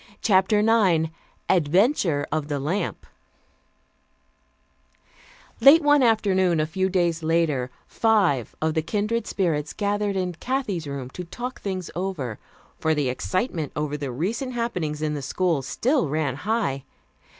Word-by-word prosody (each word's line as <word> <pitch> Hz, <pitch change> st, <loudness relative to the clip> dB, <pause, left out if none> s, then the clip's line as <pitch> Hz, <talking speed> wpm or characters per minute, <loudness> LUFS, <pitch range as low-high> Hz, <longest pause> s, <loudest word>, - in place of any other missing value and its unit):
CHAPTER 200 Hz, 0 st, +4 dB
IX 195 Hz, -8 st, +3 dB, 0.4 s
ADVENTURE 175 Hz, -, +2 dB
OF 155 Hz, -1 st, -1 dB
THE 145 Hz, -2 st, -2 dB
LAMP 170 Hz, +7 st, -2 dB, 2.5 s
Late 290 Hz, +7 st, +7 dB
one 290 Hz, -1 st, +5 dB
afternoon, 190 Hz, -7 st, +3 dB
a 155 Hz, -, +2 dB
few 190 Hz, +4 st, -1 dB
days 175 Hz, -3 st, +1 dB
later, 160 Hz, -6 st, +1 dB, 0.2 s
five 195 Hz, -, +1 dB
of 160 Hz, 0 st, +1 dB
the 160 Hz, -, +1 dB
Kindred 210 Hz, +8 st, -1 dB
Spirits 160 Hz, -6 st, -1 dB
gathered 205 Hz, -1 st, -1 dB
in 180 Hz, -1 st, -1 dB
Kathy's 200 Hz, -, -3 dB
room 135 Hz, -2 st, -5 dB
to 180 Hz, -, -6 dB
talk 245 Hz, +9 st, -7 dB
things 185 Hz, -3 st, -4 dB
over, 170 Hz, -, -3 dB, 0.4 s
for 160 Hz, 0 st, +1 dB
the 145 Hz, -4 st, 0 dB
excitement 170 Hz, -, -2 dB
over 150 Hz, 0 st, -2 dB
the 140 Hz, -3 st, -4 dB
recent 225 Hz, -, -3 dB
happenings 180 Hz, -11 st, -2 dB
in 150 Hz, -1 st, 0 dB
the 145 Hz, -, -4 dB
school 165 Hz, +2 st, 0 dB
still 175 Hz, -, 0 dB
ran 150 Hz, -2 st, 0 dB
high. 180 Hz, -, -1 dB
175 Hz, 135 wpm, -24 LUFS, 150-210 Hz, 2.5 s, Late